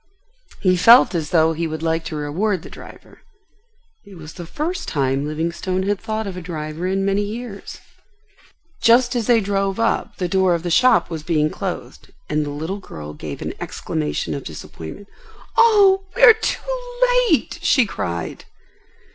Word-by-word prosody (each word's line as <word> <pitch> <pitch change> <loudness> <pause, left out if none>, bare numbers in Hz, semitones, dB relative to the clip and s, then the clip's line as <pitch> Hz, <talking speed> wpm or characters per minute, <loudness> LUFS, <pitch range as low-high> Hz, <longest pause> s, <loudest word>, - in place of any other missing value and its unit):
He 185 -1 +3
felt 230 +5 +7
as 160 -4 -2
though 160 -1 +3
he 165 +1 -2
would 155 0 -5
like 165 0 0
to 155 - -5
reward 165 +6 -1
the - - -11
driver. - - -14 0.8
It 200 - -14
was 160 -2 -10
the 175 -2 -9
first 340 - -4
time 135 -1 0
Livingstone 170 +4 -2
had 200 0 -1
thought 220 -1 -3
of 195 -2 -5
a 180 - -6
driver 160 0 -5
in 195 +1 0
many 195 +1 +1
years. 210 0 -6 1.0
Just 240 +2 +4
as 235 -3 -1
they 240 -2 +5
drove 195 0 -1
up 230 0 0
the 180 - -1
door 185 0 +2
of 170 - -4
the 175 - -2
shop 250 0 +4
was 160 -2 -4
being 155 -1 0
closed, - - -6 0.2
and 150 0 +1
the 145 - -5
little 160 +7 -4
girl 75 - -9
gave 75 - -7
an - - -4
exclamation 75 -1 -3
of - - -5
disappointment. 80 - -9 0.5
"Oh, 405 -4 +5
we - - 0
are 475 -3 +11
too - - -4 0.3
late!" - - +1
she 255 -4 +4
cried. 85 - -5
185 Hz, 170 wpm, -20 LUFS, 155-225 Hz, 1.0 s, are